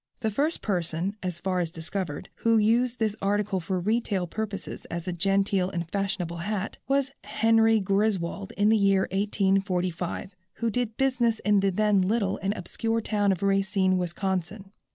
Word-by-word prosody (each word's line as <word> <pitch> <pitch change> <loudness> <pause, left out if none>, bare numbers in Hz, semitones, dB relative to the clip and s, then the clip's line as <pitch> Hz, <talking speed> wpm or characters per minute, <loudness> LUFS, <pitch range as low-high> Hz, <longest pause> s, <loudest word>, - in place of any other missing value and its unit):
The 220 -2 0
first 295 +9 0
person, 180 0 -1
as 180 -2 -3
far 185 +1 -1
as 170 -2 0
discovered, 165 -1 -5
who 230 -1 +3
used 235 +3 +2
this 215 -2 0
article 200 -1 0
for 185 +2 -2
retail 205 -1 0
purposes 210 +2 -5
as 170 +1 -5
a 180 - -1
genteel 195 +1 +1
and 170 -3 -3
fashionable 180 -2 -2
hat, 200 +3 -3
was 275 0 +1
Henry 225 0 +3
Griswold 195 0 0
in 205 +1 +2
the 220 - +5
year 195 -2 +4
1845, 190 -2 0 0.2
who 230 0 -1
did 230 -1 -2
business 250 -4 +2
in 210 -1 +3
the 195 0 +2
then 205 +1 +2
little 200 +1 0
and 195 - 0
obscure 225 +5 -2
town 205 -2 +1
of 190 0 -2
Racine, 195 -1 +2
Wisconsin. 190 +2 -3
195 Hz, 160 wpm, -27 LUFS, 185-215 Hz, 0.2 s, the